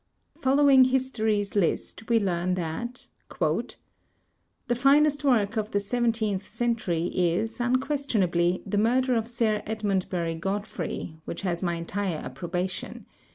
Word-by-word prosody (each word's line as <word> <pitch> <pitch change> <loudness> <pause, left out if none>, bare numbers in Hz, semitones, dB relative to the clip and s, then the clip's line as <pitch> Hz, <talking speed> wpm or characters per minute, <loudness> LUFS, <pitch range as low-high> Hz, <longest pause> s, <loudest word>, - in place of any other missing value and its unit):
Following 270 -1 +6
history's 220 -6 0
list, 200 +4 -1
we 230 -1 +4
learn 180 -2 0
that: 185 +9 -4 0.3
"The - - +1 1.1
finest 290 +3 +4
work 230 -5 +2
of 215 -1 -1
the 205 - +1
seventeenth 220 -2 -1
century 220 -8 -1
is, 185 +7 0
unques 265 +4 0
tionably, 175 -5 +1
the 200 +1 0
murder 250 +4 +2
of 225 -1 0
Sir 225 -3 0
Edmondbury 190 -6 -1
Godfrey, 195 -3 -4
which 170 - -6
has 175 -3 -1
my 175 -2 0
entire 175 +1 -2
approbation. 175 +8 -4
210 Hz, 120 wpm, -26 LUFS, 180-240 Hz, 1.1 s, Following